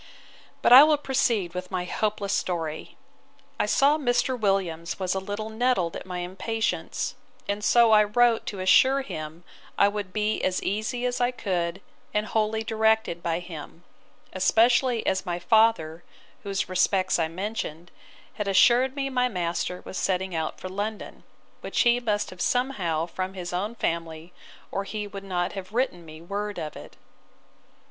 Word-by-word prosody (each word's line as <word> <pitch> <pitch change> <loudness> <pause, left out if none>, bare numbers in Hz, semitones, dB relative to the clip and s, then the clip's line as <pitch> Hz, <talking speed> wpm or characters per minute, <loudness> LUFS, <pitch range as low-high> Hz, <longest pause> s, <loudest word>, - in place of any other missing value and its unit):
But - - +6
I 265 +3 +12
will 305 0 +4
proceed 240 -10 0
with 180 0 -5
my 180 -2 -2
hopeless 205 0 -1
story. 165 -5 -3 0.6
I - - +1
saw 290 +3 +3
Mr. 260 -1 +1
Williams 190 -7 -1
was 185 -2 -1
a 190 - -1
little 205 +3 -5
nettled 220 -7 0
at - - -7
my 180 -1 -4
impatience; 220 +4 -2 0.3
and 205 +1 -2
so 235 0 +5
I 210 -1 +6
wrote 235 +2 +2
to 200 - -4
assure 260 +9 +5
him 155 - -7 0.3
I 200 - +5
would 205 -2 -4
be 215 +1 -1
as 185 0 0
easy 220 +5 -2
as 245 0 -1
I 245 - +3
could, 185 -6 -2 0.3
and 210 0 +1
wholly 220 0 0
directed 220 -5 +1
by 165 -1 -1
him; 165 -1 -10 0.5
especially 235 +5 +3
as 190 0 0
my 175 -2 -3
father, 175 -5 +2 0.4
whose 195 -1 -2
respects 185 0 +1
I 165 - +1
mentioned, 175 -2 -5 0.4
had 210 - -4
assured 240 +7 +4
me 275 -1 -1
my 250 -1 +1
master 180 -2 -3
was 190 - -5
setting 190 0 -1
out 160 -1 -3
for - - -6
London, 205 +3 -5 0.4
which - - -1
he 240 0 +4
must 210 -4 -1
have 185 -1 -9
somehow 195 - 0
from 185 +2 -5
his 180 -1 -6
own 205 +6 -2
family 165 -3 -3 0.4
or 195 - -2
he 210 +1 -5
would 200 -1 -8
not 180 -2 -2
have 195 0 -8
written 240 -8 -1
me 155 +1 -11
word 205 +3 -4
of 150 - -5
it. - - -11
200 Hz, 165 wpm, -26 LUFS, 180-225 Hz, 0.6 s, I